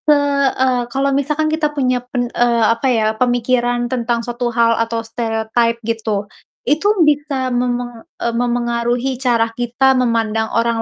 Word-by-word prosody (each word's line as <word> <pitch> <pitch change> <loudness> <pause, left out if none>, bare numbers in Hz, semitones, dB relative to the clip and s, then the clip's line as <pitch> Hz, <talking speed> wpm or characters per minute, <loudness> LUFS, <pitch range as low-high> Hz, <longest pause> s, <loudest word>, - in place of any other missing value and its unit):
Heeh, 280 -3 +2
kalau 275 +2 0
misalkan 295 +3 0
kita 315 -1 +1
punya 255 -2 +1
pen 245 -1 -1
eee, 235 -1 +2
apa 230 +4 -2
ya, 225 -3 +2
pemikiran 245 0 +1
tentang 235 -2 -2
suatu 240 0 -2
hal 230 -1 +3
atau 230 0 -2
stereotype 225 0 -1
gitu, 220 -3 -2 0.4
itu 300 +9 +1 0.2
bisa 285 -4 0
memeng 245 -1 -2 0.2
eee, 235 - -2
memengaruhi 240 +1 -1
cara 230 -3 +1
kita 245 +3 +2
memandang 225 -3 0
orang 230 0 +1
240 Hz, 140 wpm, -18 LUFS, 230-260 Hz, 0.4 s, hal